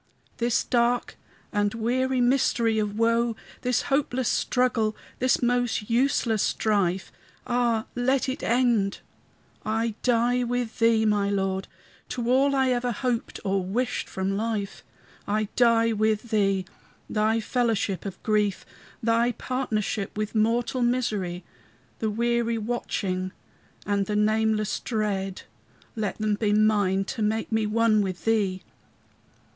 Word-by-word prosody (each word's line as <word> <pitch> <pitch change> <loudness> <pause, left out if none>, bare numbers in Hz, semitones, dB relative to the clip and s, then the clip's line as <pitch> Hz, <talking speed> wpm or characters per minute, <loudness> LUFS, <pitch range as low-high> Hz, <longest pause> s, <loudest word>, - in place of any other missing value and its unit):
This 235 -1 +1
dark 240 0 +1 0.4
and 205 0 +1
weary 255 +3 0
mystery 240 -3 +2
of 210 0 -2
woe, 230 0 +2 0.3
This 250 -1 +1
hopeless 265 -3 0
struggle, 230 -4 +1 0.2
this 255 0 +2
most 245 -3 0
useless 235 -3 +2
strife, 190 -4 0 0.3
Ah, 240 -2 +1
let 260 +2 +1
it 260 - -3
end! 235 -5 +1 0.6
I 225 +1 -1
die 245 0 +2
with 245 -1 -2
thee, 230 -1 +4
my 205 -2 +2
Lord, 195 -1 -1 0.4
To 245 -1 -2
all 275 +2 +3
I 265 -1 +3
ever 245 0 0
hoped 240 +1 -2
or 195 -1 +1
wished 240 +7 -2
from 190 +1 -2
life. 210 -2 -3 0.4
I 210 0 0
die 230 -1 +4
with 215 +2 0
thee: 195 -3 +2 0.4
thy 220 +1 +1
fellowship 225 -5 0
of 195 -3 -7
grief, 210 -3 +1 0.4
Thy 230 +2 +2
partnership 220 -6 -2
with 215 0 -2
mortal 235 +4 +1
misery, 210 -8 -1 0.6
The 220 - 0
weary 235 +1 0
watching 195 -5 -2 0.5
and 200 -1 0
the 210 - -1
nameless 215 0 +1
dread, 200 -4 -2 0.5
Let 215 -3 -2
them 215 -1 0
be 205 0 +1
mine 205 -3 +3
to 225 - -5
make 220 +2 0
me 220 -1 +1
one 220 0 +3
with 185 -3 -4
thee. 200 -4 +1
220 Hz, 130 wpm, -26 LUFS, 205-240 Hz, 0.6 s, thee